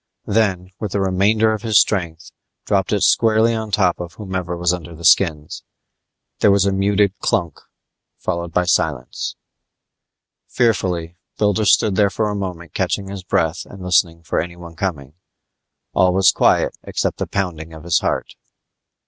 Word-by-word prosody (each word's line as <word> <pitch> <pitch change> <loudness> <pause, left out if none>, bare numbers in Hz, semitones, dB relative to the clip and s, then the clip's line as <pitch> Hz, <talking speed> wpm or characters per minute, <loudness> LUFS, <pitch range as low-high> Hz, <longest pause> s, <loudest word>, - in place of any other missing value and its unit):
Then, 95 -4 0
with 105 -3 -4
the 100 - 0
remainder 100 +4 +2
of 110 - -4
his 110 -3 +4
strength, 85 -5 -1 0.3
dropped - - 0
it - - +1
squarely 115 +1 +3
on 110 -1 -3
top 95 -3 +1
of 85 0 -7
whomever 95 -4 -4
was 90 +1 +1
under 85 -2 -7
the 85 +1 -9
skins. 80 -5 +2 0.8
There - - +4
was 100 -1 +4
a 100 - +2
muted 100 0 +2
clunk 85 - -1 0.6
followed 85 0 -3
by 90 +2 +1
silence. 80 -4 -1 1.1
Fearfully 90 -8 0 0.2
Builder 105 0 +1
stood 100 -1 +3
there 100 -1 +4
for 105 +1 -1
a - - -3
moment 90 -5 -6
catching 100 -1 -2
his 100 -1 -6
breath 85 -1 0
and 95 -2 -12
listening 85 -2 +1
for 80 - -1
anyone 85 -1 -9
coming. 75 -6 -4 0.8
All 90 -1 +3
was 95 -2 +5
quiet - - +2
except - - -3
the - - -2
pounding 85 -5 -3
of 80 -1 -11
his 85 -1 +2
heart. - - -2
95 Hz, 155 wpm, -19 LUFS, 85-100 Hz, 1.1 s, was